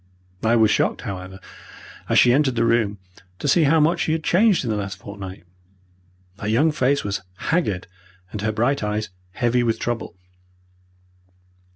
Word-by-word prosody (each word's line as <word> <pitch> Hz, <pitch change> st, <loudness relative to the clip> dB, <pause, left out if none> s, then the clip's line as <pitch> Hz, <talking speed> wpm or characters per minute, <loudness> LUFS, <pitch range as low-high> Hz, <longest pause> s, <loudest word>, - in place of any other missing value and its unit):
I 110 Hz, +1 st, +3 dB
was 110 Hz, -2 st, +4 dB
shocked, -, -, +1 dB
however, 95 Hz, -1 st, -7 dB, 0.7 s
as -, -, +3 dB
she 120 Hz, -, +6 dB
entered 135 Hz, -2 st, +2 dB
the 115 Hz, -, +2 dB
room 115 Hz, -3 st, +1 dB, 0.4 s
to 145 Hz, -, -4 dB
see 155 Hz, +3 st, +4 dB
how 160 Hz, +3 st, +4 dB
much 160 Hz, +4 st, +2 dB
she 160 Hz, -, 0 dB
had 160 Hz, -1 st, -2 dB
changed 200 Hz, +1 st, +3 dB
in 115 Hz, -, -1 dB
the -, -, 0 dB
last 100 Hz, -2 st, -4 dB
fortnight. 100 Hz, -1 st, -9 dB, 1.0 s
Her 105 Hz, -, -4 dB
young 125 Hz, +9 st, +3 dB
face 140 Hz, -1 st, +1 dB
was 100 Hz, -1 st, -3 dB
haggard 105 Hz, -, -1 dB, 0.5 s
and 105 Hz, -, -5 dB
her 110 Hz, +1 st, 0 dB
bright 120 Hz, +6 st, 0 dB
eyes 105 Hz, -1 st, -2 dB, 0.2 s
heavy 120 Hz, +2 st, +1 dB
with 115 Hz, -2 st, 0 dB
trouble. 120 Hz, -6 st, -4 dB
115 Hz, 165 wpm, -22 LUFS, 105-140 Hz, 1.0 s, she